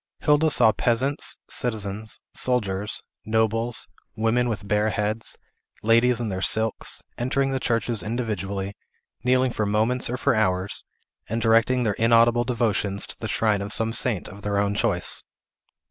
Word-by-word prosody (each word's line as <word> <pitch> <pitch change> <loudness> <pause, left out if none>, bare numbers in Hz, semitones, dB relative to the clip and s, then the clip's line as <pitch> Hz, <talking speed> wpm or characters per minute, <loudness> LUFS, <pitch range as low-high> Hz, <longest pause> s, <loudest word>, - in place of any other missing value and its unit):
Hilda 150 +1 +3
saw 110 -6 +5
peasants, 130 +7 0
citizens, 110 -3 -3
soldiers, 105 -5 0 0.2
nobles, 110 +2 0 0.3
women 115 +2 +1
with 110 -2 -4
bare 105 +1 +2
heads, 105 +1 -1 0.5
ladies 115 +2 +4
in 115 -2 -2
their 95 -1 -3
silks, 110 +2 0 0.2
entering 135 +3 0
the 135 - -1
churches 115 -2 0
individually, 100 -4 -3 0.5
kneeling 130 +1 +3
for 105 -2 -1
moments 110 +5 +2
or 125 - -2
for - - +2
hours, 95 -3 0 0.4
and 115 +2 -1
directing 115 +2 +3
their 105 -3 +1
inaudible 115 +2 +4
devotions 110 -5 -1
to - - -9
the - - -4
shrine 105 -3 +1
of 100 +1 -5
some 115 +1 +1
saint 115 -4 +1
of 100 +3 -11
their 100 0 -1
own 100 0 +1
choice. 100 -4 +1
110 Hz, 145 wpm, -24 LUFS, 105-120 Hz, 0.5 s, saw